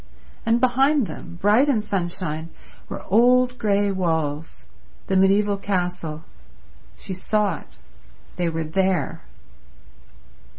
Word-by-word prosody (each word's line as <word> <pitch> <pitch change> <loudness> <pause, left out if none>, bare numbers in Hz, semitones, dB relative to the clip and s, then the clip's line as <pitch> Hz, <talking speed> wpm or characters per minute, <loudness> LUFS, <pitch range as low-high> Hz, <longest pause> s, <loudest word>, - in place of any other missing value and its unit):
And 230 +1 +3
behind 265 +2 +3
them, 175 - -9
bright 215 +9 +4
in 250 -6 +3
sunshine, 175 -5 -3 0.4
were - - -6
old 250 +4 +4
grey 205 -2 +2
walls—the 160 - -4
mediaeval 200 +2 +3
castle 180 -5 -3 0.7
—she 190 - -6
saw 200 -1 0
it—they 65 - -8
were 165 0 -2
there 185 +3 0
190 Hz, 95 wpm, -23 LUFS, 165-210 Hz, 0.7 s, bright